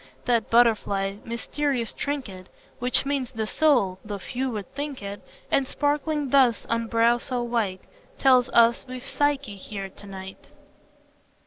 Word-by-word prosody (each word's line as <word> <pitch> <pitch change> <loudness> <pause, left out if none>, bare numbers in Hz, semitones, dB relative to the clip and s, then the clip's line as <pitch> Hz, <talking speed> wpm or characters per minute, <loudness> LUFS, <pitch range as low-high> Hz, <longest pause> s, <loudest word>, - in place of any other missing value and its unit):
That 235 -2 +1
butterfly, 205 -4 +2
mysterious 240 +1 -2
trinket, 230 -11 -5 0.3
Which 250 +2 +3
means 275 -3 -1
the 225 -3 -3
soul, 215 - +2
(though 210 -1 -5
few 255 +7 -3
would 210 -5 -6
think 285 -5 -5
it,) 200 0 -6 0.3
And 270 -1 +2
sparkling 290 -1 -1
thus 255 -5 +4
on 230 0 -1
brow 230 +1 +3
so 245 0 -2
white 225 -6 -1 0.4
Tells 255 -2 +4
us 235 0 +4
we've 255 +1 -7
Psyche 280 -7 0
here 195 0 -6
to 200 - -14
night." 190 -1 -9
235 Hz, 140 wpm, -25 LUFS, 205-270 Hz, 0.4 s, thus